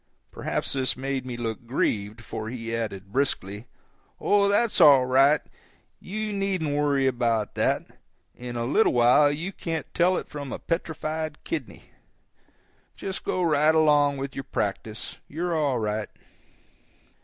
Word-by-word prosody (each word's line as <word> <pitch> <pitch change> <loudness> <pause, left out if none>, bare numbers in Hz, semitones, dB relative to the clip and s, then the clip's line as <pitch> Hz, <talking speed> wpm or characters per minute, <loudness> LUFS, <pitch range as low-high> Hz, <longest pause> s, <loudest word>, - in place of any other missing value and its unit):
Perhaps - - -2
this 130 -2 0
made 135 -1 -3
me 120 -2 -5
look 115 0 -4
grieved, 110 -3 -1
for 110 0 -6
he 115 -1 -4
added, 100 -4 -5
briskly: 105 -5 -1 0.5
"Oh, 200 -1 +3
that's 210 +3 +2
all 135 -3 +8
right, 135 +4 +4 0.6
you 215 +2 -4
needn't 190 -7 -1
worry 145 -2 +2
about 120 -4 0
that; - - +1 0.5
in 120 0 -7
a 120 0 -1
little 150 - +3
while 125 +5 +5
you 165 +6 -4
can't 165 -4 -4
tell 180 +1 +3
it - - -5
from 145 -3 -7
a - - -3
petrified 160 -2 -3
kidney. 335 - -6 1.0
Just 190 -1 -5
go 185 - -1
right 155 -1 +3
along 145 -2 +4
with 135 0 -5
your 135 - -5
practice; 110 -2 -4
you're 170 +3 -2
all 145 -5 +1
right." 105 -1 -2
140 Hz, 145 wpm, -26 LUFS, 120-160 Hz, 1.0 s, all